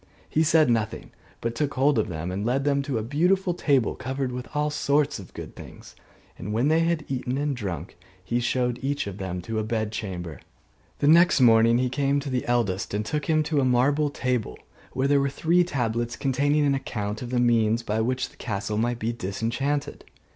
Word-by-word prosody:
He 155 - +1
said 160 -1 +4
nothing, 110 -2 -1 0.3
but 115 0 -2
took 140 +3 -2
hold 135 -1 +3
of 110 - 0
them 85 +1 -4
and 95 +2 -3
led 125 +4 0
them 140 -1 +2
to 140 -3 -2
a 110 - -2
beautiful 175 - +1
table 140 -8 +1
covered 130 0 -3
with 125 0 -6
all 150 0 +1
sorts 145 -2 +1
of 95 - -11
good - - -8
things: - - -12 0.4
and 95 +4 -5
when 120 +7 +1
they 160 +1 +4
had 165 -2 0
eaten 130 -1 -2
and 145 -1 -1
drunk, 95 -7 -5 0.3
he 120 +5 -1
showed 125 0 0
each 140 +2 -1
of 100 0 -7
them 90 -2 -4
to 110 +3 -3
a - - -1
bed 110 -1 -2
chamber. 90 -7 -5 0.6
The 145 - +1
next 170 +2 +6
morning 115 -1 +6
he 125 +1 +1
came 140 +2 +1
to 140 -1 -5
the 125 -1 -2
eldest 100 -6 0
and 105 +1 -1
took 150 +5 -2
him 155 -1 +3
to 150 -1 0
a - - +1
marble 135 +4 +2
table, 125 - -2 0.4
where 130 +1 +1
there 140 0 +4
were 140 - +1
three 170 +5 +2
tablets, 120 -7 -2
containing 145 +2 +1
an 140 - +3
account 105 -5 -3
of 125 - -5
the 125 0 0
means 115 -1 +2
by 110 0 -1
which 125 +2 -1
the - - -22
castle 105 -1 -3
might 120 +1 0
be 115 0 -2
disenchanted. 120 +7 -2
125 Hz, 210 wpm, -25 LUFS, 110-145 Hz, 0.6 s, next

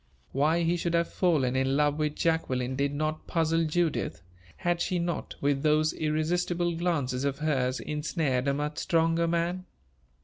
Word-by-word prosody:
Why 155 +5 +2
he 170 +1 +1
should 170 0 -1
have 170 0 0
fallen 145 -9 +2
in 135 +1 +1
love 150 0 +2
with 150 -1 0
Jacqueline 130 -6 0
did 140 +1 0
not 155 +2 -3
puzzle 165 -1 +1
Judith: 160 - -1 0.3
had 175 0 0
she 185 - 0
not, 170 0 -3
with 140 -1 +1
those 155 +1 +3
irresistible 170 +3 0
glances 145 -7 -1
of 140 -1 -1
hers, 135 -4 0
ensnared 150 -3 -1
a 140 - +2
much 150 +1 -3
stronger 165 0 +2
man? 170 +2 -1
155 Hz, 160 wpm, -28 LUFS, 140-170 Hz, 0.3 s, those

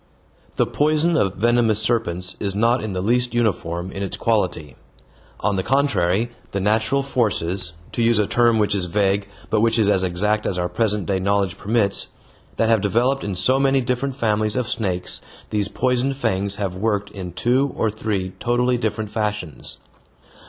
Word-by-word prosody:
The - - +2
poison 155 +3 +1
of 95 - +1
venomous 115 0 +2
serpents 95 -6 -1
is 100 -1 -2
not 115 +4 +2
in 110 -3 -3
the 90 0 -2
least 120 +3 +1
uniform 90 -6 -1
in 95 - -6
its 100 - -3
quality. 90 - -1 0.7
On 100 -2 +1
the - - +1
contrary, 120 -4 +1 0.2
the 100 - 0
natural 110 +7 +1
forces 95 -9 0 0.2
to - - -2
use 115 -1 +3
a 105 - +3
term 120 +1 +3
which 105 -2 +2
is 95 -3 +1
vague, 100 +2 0 0.2
but 110 - +3
which 115 0 +3
is 110 -3 +3
as 95 -2 +3
exact 105 +4 0
as 90 - -2
our 90 0 0
present 105 -4 0
day 95 +1 0
knowledge 100 -1 +1
permits 105 -2 0 0.5
that 115 - +1
have 115 -2 +3
developed 120 +7 +1
in 100 -2 -3
so 125 +9 +3
many 135 0 +3
different 125 +2 -1
families 110 -4 0
of 125 -2 -1
snakes 95 -8 -2 0.3
these 105 -2 0
poisoned 130 +4 0
fangs 100 -5 -1
have 100 -3 -3
worked 105 +1 -1
in 95 -3 -7
two 125 +9 +1
or 110 - +1
three 100 -4 -3
totally 125 +1 +1
different 110 -2 -2
fashions. 105 - -3
105 Hz, 175 wpm, -21 LUFS, 95-120 Hz, 0.7 s, use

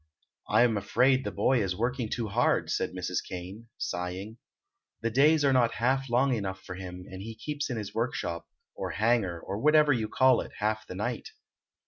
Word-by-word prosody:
"I'm 120 -3 +4
afraid 130 +6 +3
the - - -3
boy 130 -3 +2
is 95 -3 -1
working 120 +2 -1
too 115 -1 -2
hard," 120 +5 +1
said - - 0
Mrs. 90 -1 -2
Kane, 95 +6 -8
sighing. 95 +6 -4 0.6
"The 115 0 -1
days 145 +4 +4
are 135 - +4
not 120 -2 +3
half 135 +2 +1
long 130 +3 +3
enough 95 -4 -3
for 90 - -7
him, 90 -1 -8
and 95 0 -8
he 110 +2 -7
keeps 145 +3 -4
in 125 - -2
his 105 -2 -5
workshop, 110 -8 -2 0.3
or - - -4
hangar, 105 -6 +1
or 100 +4 -5
whatever 150 +1 +5
you 110 -4 -1
call 130 +2 +4
it, - - -9
half 110 +1 -1
the - - -7
night." - - -3
115 Hz, 185 wpm, -29 LUFS, 95-130 Hz, 0.6 s, whatever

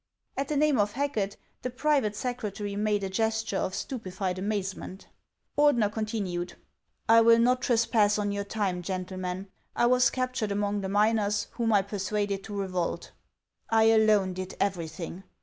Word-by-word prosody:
At 275 0 -2
the 300 - -1
name 295 -4 +3
of 205 0 +1
Hacket, 235 -8 -1 0.2
the 250 - -3
private 260 -4 +1
secretary 210 -4 -4
made 210 -1 0
a - - 0
gesture 220 0 0
of 190 - -2
stupefied 190 -6 -4
amazement. 195 -1 -4 0.5
Ordener 245 -8 +4
continued: 205 -6 -3 0.3
" - - -47
I 230 0 +7
will 230 0 +6
not 250 +2 +3
trespass 225 -4 +3
on 205 -1 -1
your 200 0 -2
time, 200 -3 -2
gentlemen. 185 +1 -4 0.3
I - - +3
was 250 0 +4
captured 255 -5 -2
among 205 0 0
the 190 - -3
miners, 205 0 +2
whom 230 -2 -1
I 200 -2 +4
persuaded 200 0 -2
to 205 -2 -5
revolt. 185 -3 -2 0.6
I 225 0 +5
alone 215 -4 +4
did 185 0 -6
everything. 170 -2 -3
205 Hz, 155 wpm, -28 LUFS, 195-230 Hz, 0.6 s, I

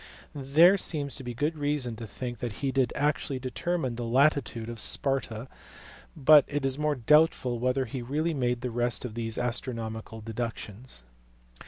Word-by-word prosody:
There 155 +8 +5
seems 145 -5 0
good 130 +6 -2
reason 145 -5 -1
to 115 -1 -7
think 120 +3 -6
that 120 -3 -4
he 135 - +1
did 130 -3 +1
actually 145 -1 0
determine 130 0 -2
the 120 - -3
latitude 130 -2 +1
of 115 -1 -7
Sparta, 130 -4 0 0.7
but 150 +1 +7
it 145 -1 -2
is 135 +1 0
more 150 -1 +1
doubtful 130 -2 +3
whether 130 +2 0
he 125 +2 -5
really 150 +7 -1
made 125 -4 -1
the 125 -1 -3
rest 120 +1 -1
of 115 - -6
these 115 -1 -3
astronomical 115 -2 -3
deductions. 110 - -6
130 Hz, 155 wpm, -28 LUFS, 120-145 Hz, 0.7 s, but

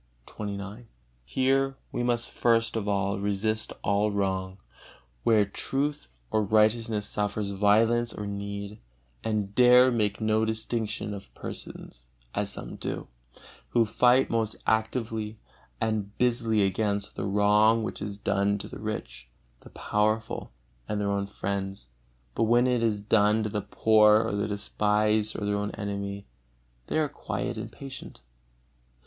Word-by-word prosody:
XXIX. 105 +2 -6 0.4
Here 135 - +1
we - - -2
must 120 -1 0
first 115 -1 +2
of 105 -2 -2
all 100 0 0
resist 105 +2 -1
all 100 +1 +2
wrong, 95 -2 -1 0.6
where 105 - +4
truth 140 - -2 0.2
or 110 - +2
righteousness 110 +1 +2
suffers 105 0 -2
violence 110 +4 +3
or 105 - -6
need, 100 0 -5 0.4
and 105 -3 -1
dare 125 +2 +7
make 105 -4 0
no 110 0 +2
distinction 110 -1 -2
of 100 -1 -9
persons, - - -9 0.3
as - - -1
some - - -7
do, - - -5 0.6
who 120 -1 +3
fight 125 +4 +4
most 110 -2 0
actively 110 -1 -1 0.4
and 105 -2 -2
busily 115 -3 +2
against 100 +1 -1
the - - -3
wrong 105 +3 +4
which - - -5
is 100 -1 -4
done 100 0 +1
to - - -6
the - - -9
rich, 60 0 -6 0.3
the - - -15
powerful, 110 - -1 0.4
and 105 - -1
their 100 -1 0
own 100 0 -1
friends; 95 -8 -4 0.4
but 115 - +1
when 120 +2 +4
it 125 -2 +2
is 110 -3 +1
done 105 +1 +3
to 110 - -1
the 105 0 -2
poor, 105 +1 +5
or - - -2
the 100 +1 -1
despised 105 +1 +1
or 105 - -3
their 105 0 0
own 105 0 -2
enemy, 100 -1 -4 0.6
they - - -1
are 155 -1 +2
quiet - - -4
and - - -6
patient. 135 - -10
105 Hz, 140 wpm, -27 LUFS, 100-115 Hz, 0.6 s, dare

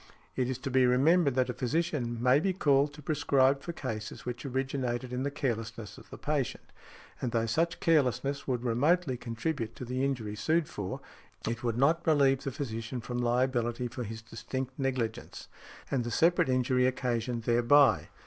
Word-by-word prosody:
It 130 -1 0
is 130 - -2
to 135 +1 -5
be 130 0 +4
remembered 140 +3 +4
that 130 -1 +2
a - - -6
physician 125 -4 -1
may 130 +2 +5
be 190 +4 0
called 145 -5 +3
to 150 - -12
prescribe 140 -2 +2
for 170 - -5
cases 115 -9 -6
which 125 +3 -5
originated 130 -2 -2
in 125 - -2
the 140 - 0
carelessness 115 -6 -4
of - - -17
the - - -9
patient; 145 -5 -2 0.5
and 125 - -1
though 115 -1 +1
such 165 +9 0
carelessness 140 -3 +1
would 125 -2 -1
remotely 140 +5 +2
contribute 115 0 -3
to 125 - -7
the 130 +2 -2
injury 120 -7 -2
sued 160 +8 +1
for, 95 -2 -5 0.5
it 115 +2 -3
would 115 -1 -1
not 155 +6 +3
relieve 140 -4 +4
the 135 - -1
physician 120 -3 -4
from 120 +1 -4
liability 120 0 0
for 125 +1 -6
his 110 0 -7
distinct 130 +3 -5
negligence 120 -4 -3 0.4
and 130 -3 +1
the 120 - -4
separate 170 +5 +3
injury 130 0 +2
occasioned 120 -2 -1
thereby. 120 +5 +4
130 Hz, 175 wpm, -30 LUFS, 120-140 Hz, 0.5 s, may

